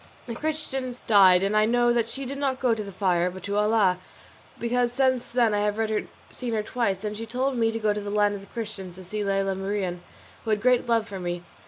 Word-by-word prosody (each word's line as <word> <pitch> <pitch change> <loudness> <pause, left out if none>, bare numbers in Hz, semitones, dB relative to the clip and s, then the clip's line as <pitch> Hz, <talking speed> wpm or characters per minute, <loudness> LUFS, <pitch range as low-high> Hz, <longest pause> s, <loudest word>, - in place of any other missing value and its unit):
The 235 - -5
Christian 270 -3 -3
died, 190 -4 +6
and 200 +2 +1
I 215 0 +5
know 240 +1 +3
that 235 -1 +1
she 270 +3 -6
did 275 +2 -5
not 270 -2 -1
go 250 -3 +2
to 220 -1 -3
the 200 - -8
fire, 180 -2 +1
but 185 +1 -10
to 200 0 -3
Allah, 210 -3 +3 0.6
because 240 0 +1
since 260 -1 +1
then 235 -3 +2
I 205 - +1
have 210 0 0 0.5
seen 240 -3 -3
her 215 - 0
twice, 210 -4 -1
and 210 0 -3
she 225 +2 -6
told 260 +3 -1
me 225 -1 +2
to 225 - -3
go 215 -2 +1
to 210 - -4
the 205 - -5
land 205 0 +2
of 200 - -6
the 195 - -14
Christians 205 -6 -6
to 185 - -10
see 210 +4 -4
Lela 195 -1 0
Marien, 190 -2 -3 0.4
who 225 - -5
had 215 -1 +2
great 250 +2 +3
love 225 -1 +2
for 195 -3 -6
me. 175 -1 -4
215 Hz, 240 wpm, -26 LUFS, 195-240 Hz, 0.6 s, died